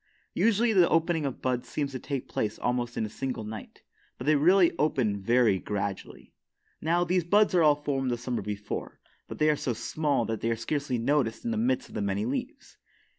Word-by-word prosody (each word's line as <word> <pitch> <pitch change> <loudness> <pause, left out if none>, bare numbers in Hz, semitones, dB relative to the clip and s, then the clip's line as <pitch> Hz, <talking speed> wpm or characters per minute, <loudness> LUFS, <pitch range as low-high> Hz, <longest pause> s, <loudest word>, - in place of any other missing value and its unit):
Usually, 230 +1 +2
the 180 -4 +5
opening 165 -2 +1
of 135 - -7
buds 125 -1 -1
seems 145 -2 -2
to 130 - -5
take 135 0 -4
place 110 0 -2
almost 120 -1 -2
in 110 - 0
a - - -3
single 125 +1 -4
night, 110 +1 -9 0.3
but 125 - -7
they 155 +1 +4
really 175 +4 +4
open 120 -9 +1
very 115 -2 +3
gradually. 100 -1 -5 0.5
Now, 170 +3 +2
these 180 +1 +1
buds 205 +5 +3
are 175 - +4
all 150 -2 +6
formed 140 -3 -2
the 120 - 0
summer 120 0 -3
before, 105 0 -5 0.3
but - - -8
they 155 0 +4
are - - +1
so 130 -3 -2
small 145 +1 -1
that 110 -1 -3
they 115 - 0
are 115 - +1
scarcely 140 +2 -2
noticed 120 - 0
in 235 - 0
the - - -1
midst 255 +2 0
of - - -16
the - - -3
many 100 +1 -1
leaves. 130 +4 -5
135 Hz, 210 wpm, -28 LUFS, 115-165 Hz, 0.5 s, all